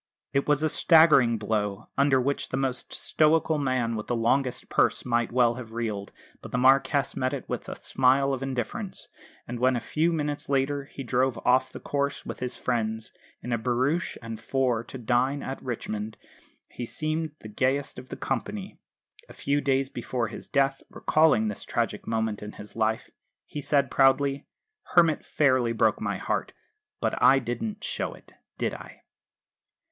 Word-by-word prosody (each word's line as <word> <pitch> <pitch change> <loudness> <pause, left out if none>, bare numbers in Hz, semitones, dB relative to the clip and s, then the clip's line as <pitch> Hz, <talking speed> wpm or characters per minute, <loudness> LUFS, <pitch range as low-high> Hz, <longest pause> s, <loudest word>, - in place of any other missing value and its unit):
It 140 - +1
was 150 0 +2
a - - +4
staggering 150 -9 +5
blow, 105 -2 -2
under 140 -1 +4
which 140 +3 -1
the 130 - -2
most 130 -2 -2
stoical 155 0 +2
man 130 -4 0
with 105 - -5
the 120 - 0
longest 125 +3 +1
purse - - +1
might 120 -1 +1
well 120 -1 +4
have 115 -2 -9
reeled; 110 -4 -3 0.3
but - - -10
the - - 0
Marquess 135 +2 +3
met 130 +2 0
it 135 - -8
with - - -4
a - - -5
smile 135 +1 +2
of 130 - -3
indifference; 135 - -4 0.4
and 120 0 -5
when, 130 +1 +3
a - - 0
few 160 +7 0
minutes 150 -3 -2
later, 140 +1 +1
he 135 - -8
drove 130 0 +1
off 130 +1 +3
the - - -8
course, 140 0 -2
with - - -6
his 125 0 -3
friends, 110 -2 -2 0.3
in 125 - -2
a 115 - +1
barouche 130 +9 0
and 115 -1 -6
four 125 -1 0
to 130 - -8
dine 130 +4 +1
at 135 - -5
Richmond, 110 -3 -4 0.5
he 125 - -6
seemed 155 +2 -2
the - - -8
gayest 130 +6 -1
of 130 - -12
the - - -6
company. 190 - -4 0.5
A - - -11
few 145 +1 0
days 135 -1 +1
before 120 -2 -3
his - - -9
death, 135 -1 +1
recalling 155 -9 +3
this 105 - -4
tragic - - -2
moment 110 -2 -1
in 105 0 -7
his 105 - -11
life, 110 0 0 0.3
he 150 - -6
said 140 -2 +2
proudly, 135 +1 +3 0.5
"Hermit 165 -3 +5
fairly 130 -5 +2
broke 110 -1 +2
my - - -1
heart. - - -2 0.5
But - - -1
I 135 - +7
didn't 120 -4 -3
show - - -3
it, - - -19 0.2
did - - -1
I?" - - -11
130 Hz, 175 wpm, -27 LUFS, 115-140 Hz, 0.5 s, I